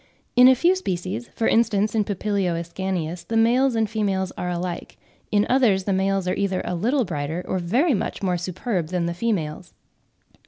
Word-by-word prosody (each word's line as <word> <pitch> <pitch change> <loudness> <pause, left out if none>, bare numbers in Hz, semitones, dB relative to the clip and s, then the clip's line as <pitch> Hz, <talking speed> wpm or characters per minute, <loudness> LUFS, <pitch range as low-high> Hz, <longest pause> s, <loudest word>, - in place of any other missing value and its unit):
In 250 0 +8
a 260 - +7
few 345 +8 +3
species, 190 - -4
for 225 - -1
instance 215 -2 +2
in 215 -2 +1
P. 205 - -2 0.3
ascanius, 170 0 -3
the 225 - -2
males 245 +3 +3
and 220 -1 +1
females 200 -3 -1
are 180 - -3
alike; 175 0 -4 0.3
in 205 0 +3
others 235 -7 +3
the 195 - 0
males 195 0 0
are 180 - +1
either 195 -2 -1
a - - -2
little 240 +9 +1
brighter, 160 +1 -4
or 185 - -1
very 245 - +2
much 200 - -3
more 180 -2 +1
superb 180 0 -3
than 175 0 -1
the 170 - -2
females. 175 -6 -3
195 Hz, 185 wpm, -23 LUFS, 180-225 Hz, 0.3 s, In